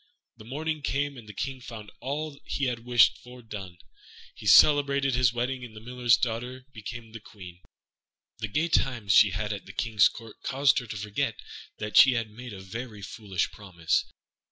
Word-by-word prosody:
When 110 +1 -13
morning 155 +3 -3
came, 140 0 -1
and 115 -4 -12
the - - -5
King 130 +5 -4
found 110 -4 -9
all 145 +2 -4
he 140 - -1
had 125 -2 -1
wished 120 -1 +5
for 125 0 -13
done, 95 -5 -8 0.6
he - - -9
celebrated 140 -2 +6
his 125 -2 +3
wedding, 125 +2 -2
and 115 -3 -10
the - - -8
Miller's 120 +1 +2
fair 120 - 0
daughter 125 +1 -9
became 115 +1 -8
Queen. 90 -3 -12 0.8
The 110 - -2
gay 150 +11 0
times 120 - +1
she 105 - +7
had 105 +3 -2
at 100 - -8
the - - -10
King's 110 -4 +3
Court 115 -2 -12
caused 140 0 +3
her 125 - -9
to 105 - -6
forget 105 0 -2 0.4
that 110 0 -2
she 130 - +9
had 115 -3 -2
made 120 +3 -9
a 95 -2 -9
very 105 +2 -7
foolish 95 -3 -3
promise. 90 -5 -1
120 Hz, 185 wpm, -27 LUFS, 105-130 Hz, 0.8 s, she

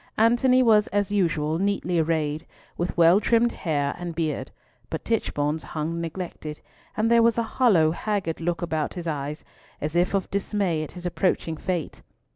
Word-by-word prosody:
Antony 240 +3 +4
was 215 -3 +5
as 205 -1 -1
usual 165 -5 +1
neatly 190 -3 0
arrayed, 155 -1 -1 0.3
with 175 0 -3
well 170 +3 +6
trimmed 235 +2 +3
hair 145 -5 -1
and 175 -2 -5
beard, 160 -2 -2 0.4
but - - -5
Tichborne's 155 -9 0
hung 165 +2 -4
neglected, 165 -3 -6 0.4
and 225 +2 +2
there 235 0 +6
was 230 0 +3
a 235 - +2
hollow, 205 -10 +3
haggard 185 -3 -2
look 170 0 -1
about 160 -1 -2
his 175 -2 -5
eyes, 150 -1 -4 0.4
as 150 +2 -4
if 175 +3 +2
of 195 - -2
dismay 195 -4 0
at 155 - -6
his 180 -1 -9
approaching 175 -2 0
fate. 175 0 -3
175 Hz, 165 wpm, -25 LUFS, 160-205 Hz, 0.4 s, well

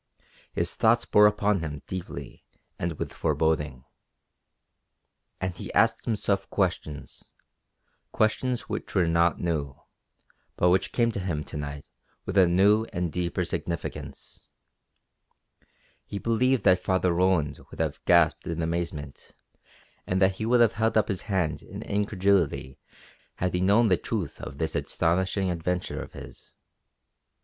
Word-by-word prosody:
His - - -1
thoughts 115 +1 +3
bore 105 0 +6
upon 105 -1 +1
him 75 -3 -5
deeply 95 -2 -7 0.4
and 85 0 -1
with - - -5
foreboding. 75 -5 0 1.5
And 95 -2 -3
he - - -7
asked - - +3
himself 100 -3 -1
questions 90 -7 -3 0.8
questions 120 +3 +1
which 105 0 -6
were 90 -3 +4
not 85 -1 +2
new, 75 -6 -2 0.8
but 90 - +3
which 90 +1 +2
came 115 -1 +2
to 105 - -4
him 85 -5 -2
to - - -10
night 75 -1 -5 0.4
with - - -4
a 95 -2 +6
new 100 +5 +4
and 85 -2 -2
deeper 90 0 -1
significance. 85 -1 -6 1.5
He 100 - -6
believed 120 +4 +1
that 90 -2 +5
Father 95 -2 +2
Roland 85 -5 +1
would - - -12
have - - -2
gasped 85 -2 +4
in 85 0 -2
amazement 80 -4 -4 0.7
and 90 - +1
that 95 0 +3
he 110 - -2
would 120 0 +4
have 115 -1 +5
held 110 0 +1
up 110 - +2
his 95 -3 -2
hands 90 -6 0
in - - -8
incredulity 100 -9 0 0.6
had 90 0 -1
he 90 - 0
known 105 +4 +4
the 90 - +4
truth 100 -7 -4
of 70 - -7
this 80 0 -2
astonishing 95 +3 0
adventure 90 +1 -2
of - - -10
his. - - -12
90 Hz, 140 wpm, -27 LUFS, 85-105 Hz, 1.5 s, bore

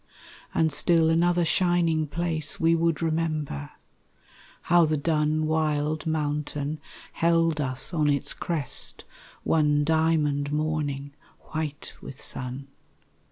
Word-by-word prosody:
And 160 -1 +2
still 160 +2 +3
another 175 +1 +2
shining 170 -2 +2
place 160 -1 -2
We 165 0 +3
would 165 0 +1
remember 155 - -2 0.9
how 175 0 +4
the 155 0 0
dun 155 0 0
Wild 155 0 0
mountain 150 -1 -2 0.3
held 165 -2 +2
us 130 +4 -1
on 155 -3 +2
its 140 -1 +1
crest 155 -7 -1 0.4
One 150 -2 +2
diamond 150 -2 +1
morning 150 -2 -2 0.4
white 155 -2 -4
with 135 - -9
sun. 130 +2 0
155 Hz, 110 wpm, -26 LUFS, 145-165 Hz, 0.9 s, how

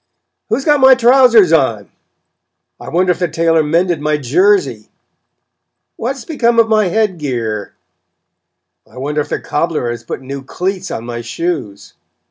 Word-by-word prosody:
"Who's 270 - -1
got 295 -1 +3
my 265 0 +7
trousers 240 -7 +5
on?" 115 -10 0 0.9
"I - - -9
wonder 180 +2 +1
if 180 - -3
the 175 - 0
tailor 165 0 +1
mended 165 +1 0
my 150 0 0
jersey?" 145 - +1 1.1
"What 255 +4 -3
has 265 - -11
become 240 -7 0
of 230 -1 +5
my 215 -1 +2
head 190 -1 0
gear?" 115 -8 -4 1.2
"I - - -16
wonder 150 +3 -2
if - - -7
the - - -2
cobbler 150 -6 -2
has 120 -1 -7
put 120 - -6
new 135 +1 -6
cleats 185 +7 -4
on 115 - -6
my 120 0 -5
shoes?" 115 - -5
165 Hz, 155 wpm, -15 LUFS, 130-210 Hz, 1.2 s, my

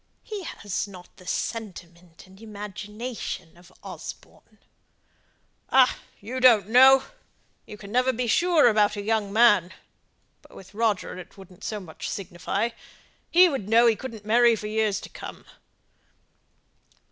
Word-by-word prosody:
He 425 -3 -6
has 205 - -4
not 180 -3 -14
the 185 - -16
sentiment 175 -7 -6
and 190 +2 -18
imagination 210 -3 -7
of 175 +1 -19
Osborne." - - -11 1.1
"Ah, 260 -1 +5 0.2
you 245 +6 -6
don't 230 -6 +5
know; 265 +3 +7 0.6
you 210 - -10
never 250 +6 0
can 255 - -1
be 250 - -1
sure 335 +4 +4
about 210 -2 +3
a 205 - -4
young 215 -2 -1
man! 205 -5 +4 0.7
But - - -19
with 195 - -14
Roger 210 -4 -1
it 185 - -13
wouldn't 190 -2 -15
so 215 - -4
much 175 -5 -8
signify. 195 +3 -3 0.6
He 360 +2 +6
would 265 - -4
know 230 +2 +5
he 230 -2 +4
couldn't 225 -3 -9
marry 235 +1 +4
for 215 - -8
years 215 -1 0
to - - -10
come." - - -10
215 Hz, 140 wpm, -25 LUFS, 195-240 Hz, 1.1 s, know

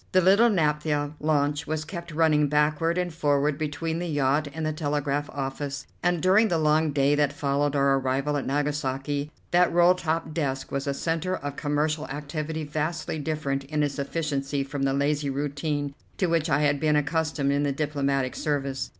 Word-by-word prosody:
The 185 - +6
little 200 +6 +5
naphtha 150 -5 +1
launch 150 -1 0
was 155 0 -2
kept 170 0 -7
running 155 -2 +3
backward 150 +3 +1
and 180 -2 -1
forward 145 -2 +1
between 160 +2 -2
the 175 - -3
yacht 145 0 +1
and 160 +2 -4
the 155 - 0
telegraph 145 -1 -1
office, 140 0 -4 0.2
and 175 -2 +1
during 195 +5 +5
the 175 - +1
long 155 0 +2
day 140 0 +3
that 145 -1 +2
followed 145 0 0
our 140 -1 +3
arrival 135 +3 0
at 140 - -2
Nagasaki 145 0 -1 0.2
that 180 0 +4
roll 175 +1 +5
top 165 -3 -2
desk 135 -5 -2
was 140 0 -2
a 140 - 0
centre 165 +4 -1
of 145 -5 -5
commercial 150 +1 -1
activity 150 +2 -4
vastly 155 +1 -3
different 145 -3 -2
in 150 +1 -1
its 145 -1 -2
efficiency 140 -1 -2
from 140 0 -5
the 135 0 +2
lazy 145 +1 0
routine 145 +1 -2 0.2
to 190 - +1
which 165 -1 +1
I 145 +1 +2
had 145 -1 +2
been 155 0 +2
accustomed 150 -1 0
in 140 0 +1
the 145 -1 +1
diplomatic 140 -2 -1
service. 140 -3 -2
150 Hz, 180 wpm, -26 LUFS, 140-160 Hz, 0.2 s, The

